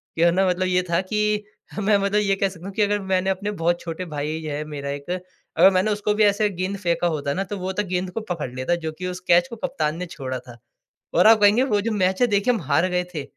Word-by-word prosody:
कि 165 - -2
है 170 - +6
ना 190 +2 +2
मतलब 185 +1 0
ये 180 0 +2
था 170 +2 +2
कि 210 +2 0 0.4
मैं 205 0 +3
मतलब 200 +1 +1
ये 195 -1 +1
कह 195 0 0
सकता 180 -1 -12
हूँ 200 - -7
कि 215 - 0
अगर 205 0 +2
मैंने 190 0 0
अपने 200 +2 -2
बहुत 175 -2 0
छोटे 170 +2 -5
भाई 150 +2 -3
है 150 -1 -4
मेरा 140 -2 -6
एक 140 +3 -6 0.5
अगर 185 +3 +8
मैंने 190 +3 +1
उसको 210 0 0
भी 215 +1 +2
ऐसा 205 +1 +3
एक 200 -3 -1
गेंद 185 +2 -2
फेंका 175 -2 0
होता 145 -3 -1
ना 195 - -1
तो 205 - -2
वो 185 +1 -3
तो 210 - -1
गेंद 180 0 -2
को 225 - -4
पकड़ 155 -7 -3
लेता 130 +7 0
जो 160 - -1
कि 180 - -3
उस 180 0 -5
कैच 175 +7 +5
को 235 - -8
कप्तान 155 -7 -2
ने 180 - -4
छोड़ा 130 -6 -5
था। 120 -1 -14 0.6
और 180 +5 +5
आप 225 -1 +7
कहेंगे 205 +5 +5
वो 205 -1 +3
जो 230 - -2
मैच 190 0 +1
है 245 - +5
देखिए 205 +3 +2
हम 220 - -3
हार 150 +5 +2
गए 180 0 0
थे। 150 -4 -3
185 Hz, 275 wpm, -23 LUFS, 165-205 Hz, 0.6 s, अगर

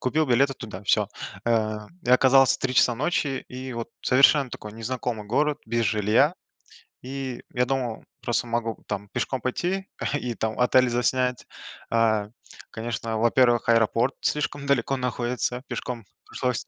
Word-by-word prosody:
купил 150 +4 +1
билеты 135 +2 +3
туда, 105 -5 -8
всё. 105 0 +2 0.4
Э, 110 -2 +1 0.3
и - - +1
оказался 135 +1 +6
в - - -31
3 130 -1 -2
часа 120 0 +4
ночи, 135 0 -1
и 130 +1 -6
вот 115 -1 -5
совершенно 135 +1 +5
такой 105 -2 -8
незнакомый 115 -1 -4
город, 150 +6 +1
без 115 +1 0
жилья. 110 - +3 0.7
И 130 -1 -5
я 125 - +3
думал, 125 -4 -2 0.2
просто 120 0 0
могу 115 -1 -2
там 100 +1 -4
пешком 125 +1 -2
пойти 185 +10 -2 0.3
и 120 -1 -3
там 110 0 -3
отель 125 0 +4
заснять. 125 +1 0 0.5
Э, 110 -3 +2 0.4
конечно, 115 0 -3
во-первых, 120 +1 +3
аэропорт 115 +2 +3
слишком 145 -1 -1
далеко 135 0 +1
находится, 125 0 -2
пешком 120 -4 -5 0.2
пришлось. 125 -2 -2
125 Hz, 145 wpm, -25 LUFS, 115-130 Hz, 0.7 s, оказался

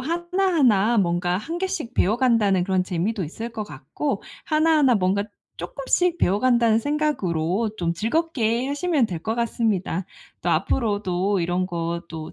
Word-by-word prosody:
하나하나 325 - +2
뭔가 175 -1 +1
1 325 - -5
개씩 360 -10 -3
배워간다는 215 -4 +2
그런 185 -1 +1
재미도 185 +3 -2
있을 225 +10 -6
것 220 -2 -5
같고 160 - -4 0.2
하나하나 305 -4 +3
뭔가 200 0 +1 0.3
쪼끔씩 345 +5 0
배워간다는 230 +3 +3
생각으로 220 - 0
좀 170 -4 -1
즐겁게 235 - 0
하시면 290 -2 +1
될 175 -5 -5
것 220 +1 -1
같습니다. 215 -6 -1 0.3
또 - - -2
앞으로도 205 -4 0
이런 175 +2 0
거 170 -1 -3
또 160 -1 -7
220 Hz, 305 characters per minute, -23 LUFS, 185-280 Hz, 0.3 s, 하나하나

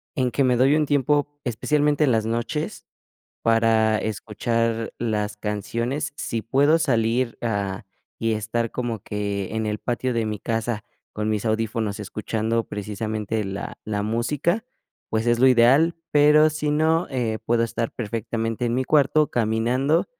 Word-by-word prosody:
en 130 -3 +1
que 140 - +1
me 125 -1 +3
doy 135 +4 +4
un 155 -1 +2
tiempo, 145 +1 +1
especialmente 150 +5 +1
en 130 - +2
las 110 -1 +1
noches, 120 +7 -3 0.6
para 115 -1 +3
escuchar 115 +2 -2
las 105 -2 -1
canciones. 115 - -2
Sí 115 -2 -3
puedo 145 +7 +3
salir, 120 -4 +1
ah, 100 -3 -2 0.3
y 115 0 0
estar 115 +2 -2
como 120 -3 -3
que 100 0 -3
en 110 - -1
el 105 0 -2
patio 125 +1 -2
de 115 -1 0
mi 105 -1 -3
casa 115 -1 -2 0.3
con 105 0 -1
mis 110 +1 -1
audífonos 110 -1 -1
escuchando 110 +2 -2
precisamente 105 +1 -3
la 95 +1 -6
la 105 -1 -2
música, 145 - 0 0.5
pues 110 +1 0
es 120 0 +3
lo 130 - +6
ideal, 130 +7 +5 0.2
pero 150 +1 +6
si 150 -1 -2
no, 160 +3 +2
eh, 120 -5 -1
puedo 115 0 +2
estar 115 0 -2
perfectamente 115 +1 -3
en 120 - 0
mi 130 +1 0
cuarto 150 +1 +3
caminando 120 +7 +1
115 Hz, 150 wpm, -23 LUFS, 110-135 Hz, 0.6 s, lo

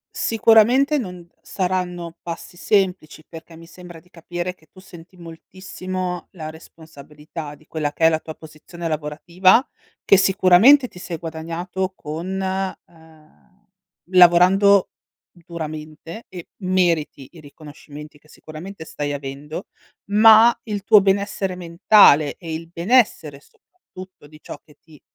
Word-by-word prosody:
Sicuramente 230 +6 +3
non 180 -7 -7
saranno 180 -3 -4
passi 170 +1 -8
semplici, 180 -6 -1
perché 165 0 -13
mi 165 0 -15
sembra 175 -1 -13
di 180 - -27
capire 175 +1 -6
che 160 - -28
tu 185 - -17
senti 180 -1 -16
moltissimo 185 +1 -7
la 155 -4 -8
responsabilità 155 -1 -12
di 155 - -25
quella 150 -2 -4
che 160 - 0
è - - +7
la 160 -1 -1
tua 160 - -9
posizione 160 +2 -10
lavorativa, 170 - +1 0.4
che 195 - +5
sicuramente 195 +8 +5
ti 180 - -18
sei 175 -2 -7
guadagnato 170 +4 -5
con 155 +4 -7 0.6
uhm, 160 +5 -24 0.4
lavorando 185 +2 +5 0.4
duramente 160 +2 -9
e 180 -2 -10 0.2
meriti 170 -7 -1
i 170 - -14
riconoscimenti 150 0 -13
che 155 - -27
sicuramente 160 +3 -11
stai 145 -2 -5
avendo, 145 +4 -8 0.4
ma 220 +3 +6
il 205 -3 -5
tuo 210 0 +6
benessere 195 -1 -1
mentale 170 -3 +4
e 165 -3 -7
il 165 +1 -9
benessere 170 - +1
soprattutto 185 - -17
di 155 +1 -17
ciò - - -10
che 150 - -22
ti, 155 -3 -19
175 Hz, 130 wpm, -20 LUFS, 155-190 Hz, 0.6 s, è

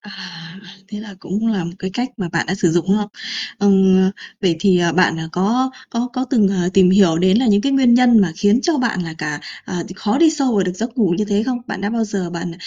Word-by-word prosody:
À, 175 -3 -11 0.3
thế 210 0 -7
là 210 -2 -10
cũng 210 +5 -3
là 200 -6 0
một 170 - -5
cái 190 - -5
cách 245 +1 -2
mà 185 -6 -4
bạn - - -2
đã 190 - -1
sử 180 -3 +1
dụng, 175 +1 0
đúng 200 - +3
không? 205 -1 -4 0.5
Ừm, 190 -1 +4 0.3
vậy 180 -5 +1
thì, 190 -3 +3
ờ, 170 -1 +1
bạn, 165 -1 +2
à, 160 - -6
có 235 +8 0 0.2
có 240 +1 -2
có 255 -1 -2
từng, 220 -7 +3
ờ, 180 -2 -1
tìm 185 -2 +5
hiểu 185 -4 +4
đến 185 +3 +3
là 255 - +1
những 205 -1 +3
cái 275 +4 -1
nguyên 260 -3 +4
nhân 240 -2 +5
mà 180 -4 +1
khiến 205 +5 +2
cho 330 -3 0
bạn 235 -7 -1
là 160 -1 -7
cả 145 -1 -4 0.2
ờ, 180 -2 -4
thì 185 - -10
khó 210 +5 -1
đi 325 0 +5
sâu 275 -6 -1
vào 200 - +2
được 180 - -2
giấc 230 +5 -6
ngủ 200 -7 +2
như 210 - +1
thế 205 0 0
không? 255 -2 -1
Bạn - - -5
đã 200 +1 -2
bao 230 0 -1
giờ 195 -4 -4
bạn 170 0 -5
200 Hz, 270 wpm, -18 LUFS, 180-230 Hz, 0.5 s, tìm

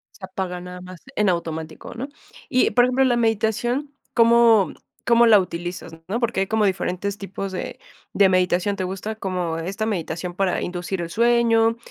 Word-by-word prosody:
Se 190 - -8
apaga 185 -1 -4
nada 180 0 -9
más 185 -1 -11
en 210 -2 +2
automático, 160 -2 -4
¿no? 260 +4 -5 0.4
Y 255 - +3
por 245 - +4
ejemplo, 255 +1 +2
la 245 - +3
meditación, 235 +5 0 0.2
¿cómo, 230 -3 +5 0.3
cómo 235 0 +5
la 220 -3 +7
utilizas? 175 -2 -5 0.2
¿no? 225 +4 -1
Porque 235 -5 0
hay 195 - 0
como 220 0 +2
diferentes 195 +1 -1
tipos 195 0 -6
de, 185 - -5 0.3
de 200 - +5
meditación, 185 +2 +1
¿te 190 - -3
gusta 195 +4 -4
como 180 -5 -3
esta 195 +6 -3
meditación 175 -3 -3
para 190 -1 0
inducir 180 +1 -3
el 170 - -4
sueño?, 230 +1 +3
195 Hz, 170 wpm, -22 LUFS, 180-230 Hz, 0.4 s, la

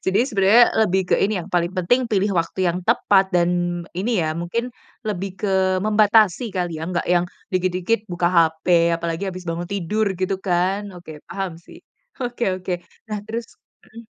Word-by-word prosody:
jadi 190 +4 +3
sebenarnya 210 +1 +5 0.2
lebih 190 0 +1
ke - - +3
ini 210 +2 +1
yang 175 - -6
paling 175 0 +1
penting 240 +8 +1
pilih 200 -1 +2
waktu 175 +2 0
yang 175 +1 0
tepat, 195 -1 +3
dan 175 0 +1
ini 205 +4 0
ya 155 0 -1
mungkin 230 +9 -3 0.4
lebih 195 -2 -2
ke 190 -2 +1
membatasi 215 +1 +3
kali 175 -3 -2
ya, 160 - -5
enggak 175 -1 -2
yang 175 0 +3 0.3
dikit-dikit 185 +4 0
buka 175 0 0
HP 170 0 +3
apalagi 165 +3 -3
habis 185 0 -8
bangun 170 +1 -3
tidur 200 +3 -1
gitu 190 0 -1
kan, 190 +2 0
oke, 160 -4 -11
paham 190 -4 -4
sih. 170 - -15 0.4
Oke 245 -1 -2
oke, 180 -1 -4 0.3
nah 215 - -3
terus 225 +2 -5 0.4
mhm, 230 +1 -12
185 Hz, 170 wpm, -22 LUFS, 175-210 Hz, 0.4 s, sebenarnya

